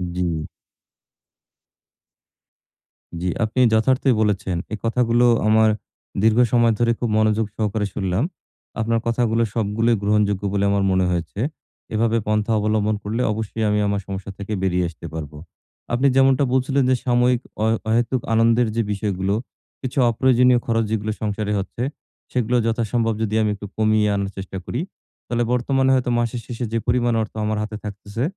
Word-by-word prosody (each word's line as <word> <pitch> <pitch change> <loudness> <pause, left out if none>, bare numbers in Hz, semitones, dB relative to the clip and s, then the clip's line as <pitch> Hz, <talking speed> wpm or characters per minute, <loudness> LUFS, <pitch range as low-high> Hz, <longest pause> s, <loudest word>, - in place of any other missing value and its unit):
জি। 85 -4 -2 2.7
জি, 90 - -1 0.2
আপনি 110 +3 -1
যথার্থই 130 +4 +3
বলেছেন। 100 -4 0 0.2
এই - - -2
কথাগুলো 120 +1 +2 0.2
আমার 110 0 +5 0.5
দীর্ঘ 110 +1 +4
সময় 120 -2 +4
ধরে 120 0 +3
খুব 120 - -1
মনোযোগ 110 0 +2
সহকারে 105 -1 -1
শুনলাম। 95 +4 -1 0.6
আপনার 115 +1 +1
কথাগুলো 115 -1 +1
সবগুলোই 115 +1 +1
গ্রহণযোগ্য 105 -1 +1
বলে 100 -1 +1
আমার 100 -1 +1
মনে 95 0 +2
হয়েছে। 85 +3 -3 0.5
এভাবে 115 +1 +2
পন্থা 105 +1 +1
অবলম্বন 105 0 +1
করলে 110 +4 -2
অবশ্যই 110 +1 -3
আমি 105 0 +2
আমার 100 0 -1
সমস্যা 100 0 -5
থেকে 100 +1 -5
বেরিয়ে 90 -1 +1
আসতে 85 -1 -12
পারবো। 75 -2 -6 0.6
আপনি 130 +4 +3
যেমনটা 135 +1 +4
বলছিলেন 135 +1 +2
যে, 130 - +4
সাময়িক 125 0 +3 0.2
অহে 110 +1 +2
অহেতুক 120 +2 +1
আনন্দের 115 +1 +4
যে 115 - +2
বিষয়গুলো, 100 -1 -1 0.5
কিছু 130 0 -5
অপ্রয়োজনীয় 125 +1 +4
খরচ 115 0 +1
যেগুলো 110 0 -1
সংসারে 105 0 -2
হচ্ছে, 105 +5 -4 0.5
সেগুলো 125 -1 0
যথাসম্ভব 115 0 0
যদি 110 0 -1
আমি 105 - +1
একটু 100 0 -8
কমিয়ে 110 -1 +3
আনার 100 -1 -1
চেষ্টা 95 0 -6
করি। 125 - -3 0.5
তাহলে 120 0 0
বর্তমানে 130 +2 +2
হয়তো 125 -1 0
মাসের 120 0 -1
শেষে 120 0 -4
যে - - +2
পরিমাণ 120 0 +2
অর্থ 110 - -5
আমার 110 0 -1
হাতে 105 0 -5
থাকতেছে 105 +3 -5
110 Hz, 150 wpm, -22 LUFS, 105-120 Hz, 2.7 s, আমার